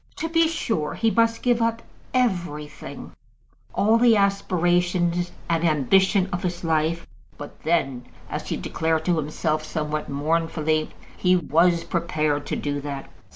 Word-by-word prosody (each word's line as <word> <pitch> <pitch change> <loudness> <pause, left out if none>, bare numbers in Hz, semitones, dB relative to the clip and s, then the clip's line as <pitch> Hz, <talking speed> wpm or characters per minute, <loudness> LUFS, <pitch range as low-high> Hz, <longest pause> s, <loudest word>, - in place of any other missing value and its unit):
To 325 - -3
be 330 0 +3
sure, 225 - -2
he 225 -1 +1
must 230 0 +2
give 240 -2 +2
up 230 0 0 0.3
everything, 175 - -2 0.6
all 220 +3 +3
the 235 -2 +5
aspirations 175 -2 +1 0.2
and 165 0 0
ambition 185 - +3
of 175 - -2
his 175 -1 -3
life; 160 +1 0 0.3
but 145 - -10
then, 135 -6 0 0.2
as - - -5
he - - -1
declared 160 0 -1
to 175 -2 +2
himself 155 +1 -1
somewhat 155 -1 -3
mournfully, 155 +1 0 0.3
he 180 0 +3
was 170 +2 +3
prepared 155 -4 -1
to - - -1
do 145 -1 -2
that. 140 -1 -6
170 Hz, 140 wpm, -24 LUFS, 155-195 Hz, 0.6 s, the